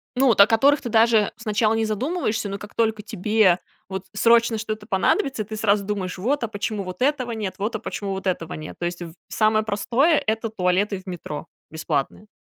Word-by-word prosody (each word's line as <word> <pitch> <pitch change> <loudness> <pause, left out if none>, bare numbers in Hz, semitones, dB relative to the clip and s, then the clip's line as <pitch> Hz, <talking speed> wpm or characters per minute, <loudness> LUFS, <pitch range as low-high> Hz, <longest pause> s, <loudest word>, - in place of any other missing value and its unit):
ну, 265 +1 +3
вот 225 -4 +3
о 200 - +9
которых 275 +6 +4
ты - - -5
даже 220 -2 +4
сначала 220 -1 +1
не 225 0 +1
задумываешься, 220 - -1
но 200 0 -4
как 205 - -11
только 220 -2 +1
тебе 210 -2 +2 0.3
вот 190 0 -5
срочно 230 +1 +4
что-то 215 -1 -5
понадобится, 235 - +1
ты 215 +1 -7
сразу 205 -2 +2
думаешь: 195 -2 -3
"Вот, 255 +8 0
а - - -4
почему 205 0 -3
вот 185 +6 -8
этого 260 -3 +1
нет, 200 -4 -4
вот, 215 +3 -2
а 220 - -2
почему 200 -3 -5
вот 190 0 -5
этого 175 -3 -2
нет." 155 0 -8
То 175 - -2
есть, 175 0 -4
в 165 -2 -7
самое 215 0 +2
простое- 245 +9 +2
это 220 +1 0
туалеты 190 0 0
в 185 - -18
метро, 165 -3 -6 0.2
бесплатные. 155 +5 -3
215 Hz, 205 wpm, -23 LUFS, 190-225 Hz, 0.3 s, о